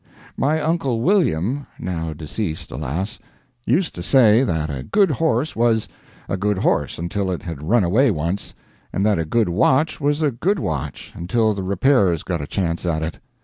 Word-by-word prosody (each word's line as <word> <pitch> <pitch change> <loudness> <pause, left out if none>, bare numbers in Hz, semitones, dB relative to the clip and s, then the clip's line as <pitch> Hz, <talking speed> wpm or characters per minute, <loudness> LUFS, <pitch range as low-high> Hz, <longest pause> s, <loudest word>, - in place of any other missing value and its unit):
My 155 +3 +1
uncle 150 -6 0
William 140 - +1
(now 80 -3 -3
deceased, 80 +3 -5
alas!) 80 - -4 0.5
used 160 - +1
to 85 - -7
say 115 +3 +5
that 80 - -1
a 70 -2 -4
good 195 - +2
horse 150 -1 0
was, 115 -2 +2 0.4
a 95 - -2
good 105 +1 0
horse 75 -6 0
until 95 +4 -2
it 90 +1 -3
had 85 -7 -6
run 105 +8 +2
away 115 +10 +3
once, 85 +1 -3 0.4
and 100 - 0
that 105 -4 +2
a 80 - -1
good 110 +5 +1
watch 135 - +2
was 145 +2 +1
a 145 - +2
good 180 - 0
watch 75 - -4
until 110 +5 +1
the 100 - -4
repairers 95 - +2
got 85 -4 -2
a 70 - -5
chance 85 -3 -2
at 80 -3 -1
it. 80 - -5
100 Hz, 180 wpm, -21 LUFS, 85-130 Hz, 0.5 s, say